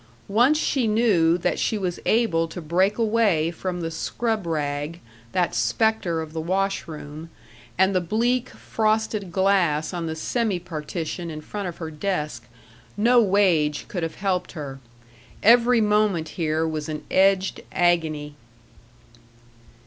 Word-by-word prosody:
Once 245 Hz, +9 st, +4 dB
she 265 Hz, -6 st, +1 dB
knew 205 Hz, -7 st, +3 dB
that 175 Hz, -, -1 dB
she 220 Hz, -, 0 dB
was 180 Hz, -3 st, -3 dB
able 215 Hz, -8 st, +2 dB
to 170 Hz, -, -8 dB
break 185 Hz, +6 st, +1 dB
away 210 Hz, -8 st, +2 dB
from 175 Hz, +1 st, -4 dB
the 165 Hz, -1 st, -3 dB
scrub 220 Hz, +3 st, -2 dB
rag, 150 Hz, +1 st, -2 dB, 0.3 s
that 175 Hz, -7 st, 0 dB
specter 165 Hz, -, +1 dB
of 160 Hz, -1 st, -8 dB
the 160 Hz, -, -3 dB
wash 195 Hz, +4 st, -1 dB
room, 155 Hz, 0 st, -8 dB, 0.5 s
and 190 Hz, +2 st, +3 dB
the 185 Hz, -, +2 dB
bleak, 235 Hz, +7 st, 0 dB
frosted 215 Hz, -3 st, -1 dB
glass 180 Hz, -5 st, +2 dB
on 170 Hz, -2 st, -3 dB
the 160 Hz, -, -3 dB
semi 215 Hz, +4 st, -1 dB
partition 170 Hz, 0 st, -5 dB
in 155 Hz, -1 st, -6 dB
front 200 Hz, +5 st, -5 dB
of 175 Hz, -, -6 dB
her 160 Hz, -2 st, -6 dB
desk, 150 Hz, -8 st, -3 dB, 0.5 s
no 240 Hz, +3 st, +5 dB
wage 185 Hz, -8 st, +2 dB
could 180 Hz, -, -4 dB
have 165 Hz, -1 st, -3 dB
helped 190 Hz, -2 st, -2 dB
her. 140 Hz, -5 st, -7 dB, 0.6 s
Every 235 Hz, +2 st, +6 dB
moment 210 Hz, -6 st, +2 dB
here 160 Hz, -1 st, -1 dB
was 155 Hz, -1 st, -4 dB
an 150 Hz, -1 st, -5 dB
edged 190 Hz, 0 st, +3 dB
agony. 160 Hz, -4 st, +1 dB
175 Hz, 140 wpm, -24 LUFS, 160-210 Hz, 0.6 s, Every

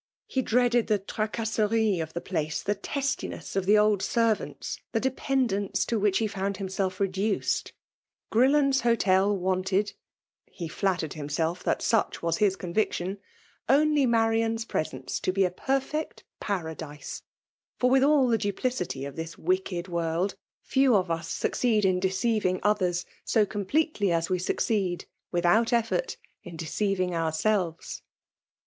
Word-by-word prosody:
He 265 Hz, -, -1 dB
dreaded 245 Hz, -1 st, +2 dB
the 210 Hz, -, +3 dB
fracOMerie* 215 Hz, 0 st, 0 dB
o£'tfae^|da<i^ 165 Hz, 0 st, -3 dB
^thd 195 Hz, +5 st, -2 dB
testiness 275 Hz, -7 st, -3 dB
of 195 Hz, -1 st, 0 dB
the 210 Hz, +1 st, +6 dB
old 210 Hz, -2 st, +3 dB
servants 215 Hz, -, -1 dB
—the 225 Hz, -, +2 dB
dependence 255 Hz, -5 st, 0 dB
to 230 Hz, -, 0 dB
which 200 Hz, -1 st, +2 dB
he 225 Hz, -, +1 dB
found 200 Hz, -1 st, -2 dB
himself 190 Hz, -1 st, -2 dB
rUaee^. 195 Hz, +2 st, 0 dB, 0.6 s
Orlllofei*s 270 Hz, +3 st, +4 dB
Hotel 205 Hz, -4 st, +3 dB
wanted 190 Hz, +2 st, 0 dB, 0.5 s
(he 170 Hz, -, -7 dB
flktiered 175 Hz, -2 st, -1 dB
himselE 155 Hz, +3 st, -1 dB
Ifaat' -, -, -2 dB
such 225 Hz, -6 st, +1 dB
was 170 Hz, +2 st, 0 dB
bis 205 Hz, -3 st, +3 dB
conviction) 190 Hz, 0 st, -2 dB, 0.5 s
only 290 Hz, 0 st, +4 dB
B^nriaA's 225 Hz, 0 st, +1 dB
presence 155 Hz, -, -3 dB
to -, -, 0 dB
be 195 Hz, +1 st, +2 dB
a 180 Hz, -, -1 dB
perfect 270 Hz, -, -2 dB, 0.2 s
Paradise; 160 Hz, -6 st, -5 dB, 0.6 s
fot^with 260 Hz, +1 st, +4 dB
all 285 Hz, -2 st, +4 dB
the 230 Hz, -2 st, +2 dB
dnpUcity 200 Hz, -, -2 dB
of 140 Hz, -, -9 dB
this 165 Hz, 0 st, -6 dB
wicked 355 Hz, -, -1 dB
woiid; 170 Hz, +1 st, -1 dB, 0.3 s
TeisKrol 255 Hz, -9 st, +4 dB
nssucoeed 190 Hz, +6 st, 0 dB
in 185 Hz, -1 st, +3 dB
deceiving 190 Hz, 0 st, +1 dB
others 185 Hz, -4 st, +1 dB, 0.2 s
so 220 Hz, -3 st, +3 dB
com« 205 Hz, -1 st, -4 dB
pietdy 290 Hz, -, +1 dB
as 165 Hz, +1 st, 0 dB
we 185 Hz, -, +1 dB
succeed, 185 Hz, -1 st, -1 dB, 0.3 s
without 175 Hz, +6 st, +3 dB
effbrt, 235 Hz, -, 0 dB, 0.3 s
in 175 Hz, -4 st, -9 dB
de 160 Hz, -, -5 dB
cdviiig 185 Hz, +1 st, 0 dB
ourseWes. 165 Hz, +2 st, -1 dB
200 Hz, 130 wpm, -27 LUFS, 180-230 Hz, 0.6 s, the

